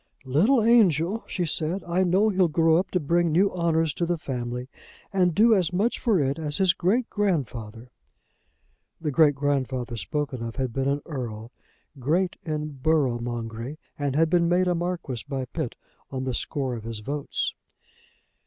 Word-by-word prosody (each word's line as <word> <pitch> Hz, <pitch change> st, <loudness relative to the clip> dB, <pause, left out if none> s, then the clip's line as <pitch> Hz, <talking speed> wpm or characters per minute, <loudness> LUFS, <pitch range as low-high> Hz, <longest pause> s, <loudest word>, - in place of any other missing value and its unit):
"Little 205 Hz, -, +3 dB
angel!" 210 Hz, -3 st, +3 dB
she 175 Hz, -, -2 dB
said. 165 Hz, +4 st, -1 dB
"I 175 Hz, +2 st, +1 dB
know 190 Hz, +4 st, +3 dB
he'll 190 Hz, -3 st, +3 dB
grow 165 Hz, 0 st, +3 dB
up 185 Hz, -, 0 dB
to 180 Hz, -, 0 dB
bring 170 Hz, +2 st, +1 dB
new 190 Hz, +5 st, +3 dB
honours 165 Hz, -3 st, +1 dB
to 170 Hz, -, -1 dB
the 175 Hz, 0 st, 0 dB
family, 125 Hz, -3 st, -4 dB, 0.5 s
and 180 Hz, -4 st, +2 dB
do 225 Hz, +2 st, +6 dB
as 185 Hz, -5 st, +2 dB
much 205 Hz, +7 st, 0 dB
for 220 Hz, -7 st, +2 dB
it 140 Hz, +2 st, 0 dB
as 150 Hz, -2 st, -2 dB
his 190 Hz, -3 st, +4 dB
great 225 Hz, +8 st, +1 dB
grandfather." 125 Hz, -, -2 dB, 1.1 s
The 155 Hz, -2 st, -2 dB
great 145 Hz, 0 st, +5 dB
grandfather 135 Hz, -4 st, -1 dB
spoken 135 Hz, +4 st, -3 dB
of 115 Hz, -1 st, -5 dB
had 130 Hz, -4 st, -2 dB
been 135 Hz, +1 st, -1 dB
an 140 Hz, +1 st, 0 dB
earl, 120 Hz, -6 st, -6 dB, 0.5 s
great 170 Hz, +8 st, +1 dB
in 155 Hz, -2 st, -3 dB
borough 140 Hz, -6 st, +2 dB
mongery, 120 Hz, +3 st, -5 dB, 0.2 s
and 140 Hz, -2 st, -2 dB
had 160 Hz, +2 st, +4 dB
been 170 Hz, -1 st, +3 dB
made 180 Hz, +1 st, +3 dB
a 180 Hz, -, +3 dB
marquis 170 Hz, -8 st, -3 dB
by 135 Hz, -2 st, -2 dB
Pitt 135 Hz, 0 st, -4 dB, 0.3 s
on 130 Hz, -1 st, -4 dB
the 130 Hz, -1 st, -2 dB
score 135 Hz, +1 st, -2 dB
of 115 Hz, -3 st, -6 dB
his 115 Hz, -1 st, -6 dB
votes. 145 Hz, +5 st, -2 dB
155 Hz, 170 wpm, -25 LUFS, 130-180 Hz, 1.1 s, do